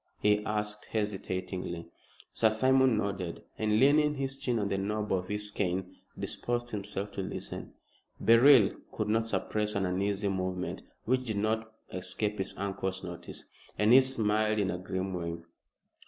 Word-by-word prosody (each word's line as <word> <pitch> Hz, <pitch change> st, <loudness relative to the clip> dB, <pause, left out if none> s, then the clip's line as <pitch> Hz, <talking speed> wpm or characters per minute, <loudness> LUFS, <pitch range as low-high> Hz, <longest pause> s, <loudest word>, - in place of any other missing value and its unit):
he 105 Hz, 0 st, +3 dB
asked 105 Hz, 0 st, -2 dB
hesitatingly. 95 Hz, -5 st, -3 dB, 0.4 s
Sir 110 Hz, -, +3 dB
Simon 130 Hz, +2 st, +4 dB
nodded, 95 Hz, -4 st, -3 dB, 0.2 s
and, 110 Hz, 0 st, +2 dB
leaning 150 Hz, +2 st, +5 dB
his 135 Hz, 0 st, -3 dB
chin 125 Hz, -4 st, 0 dB
on 105 Hz, -2 st, 0 dB
the 95 Hz, -, 0 dB
knob 105 Hz, +1 st, -1 dB
of 90 Hz, -1 st, -1 dB
his 105 Hz, +1 st, -3 dB
cane, 95 Hz, -1 st, -2 dB, 0.2 s
disposed 120 Hz, 0 st, -2 dB
himself 100 Hz, 0 st, -4 dB
to 100 Hz, -, -4 dB
listen. 95 Hz, -, -6 dB, 0.4 s
Beryl 115 Hz, -2 st, +7 dB, 0.2 s
could 110 Hz, -1 st, -2 dB
not 115 Hz, +1 st, +2 dB
suppress 105 Hz, -1 st, -1 dB
an 100 Hz, -1 st, +1 dB
uneasy 100 Hz, +2 st, 0 dB
movement, 95 Hz, -1 st, -2 dB, 0.2 s
which 130 Hz, +1 st, +1 dB
did 110 Hz, -3 st, -2 dB
not 110 Hz, +1 st, 0 dB, 0.2 s
escape 95 Hz, +3 st, -2 dB
his 95 Hz, -, -3 dB
uncle's 95 Hz, -1 st, -3 dB
notice, 90 Hz, -2 st, -7 dB, 0.3 s
and 105 Hz, +2 st, +5 dB
he 130 Hz, -, +10 dB
smiled 110 Hz, -4 st, +1 dB
in 100 Hz, -3 st, +1 dB
a 90 Hz, -, -4 dB
grim 95 Hz, +1 st, -3 dB
way. 85 Hz, -1 st, -3 dB
105 Hz, 155 wpm, -30 LUFS, 95-110 Hz, 0.4 s, he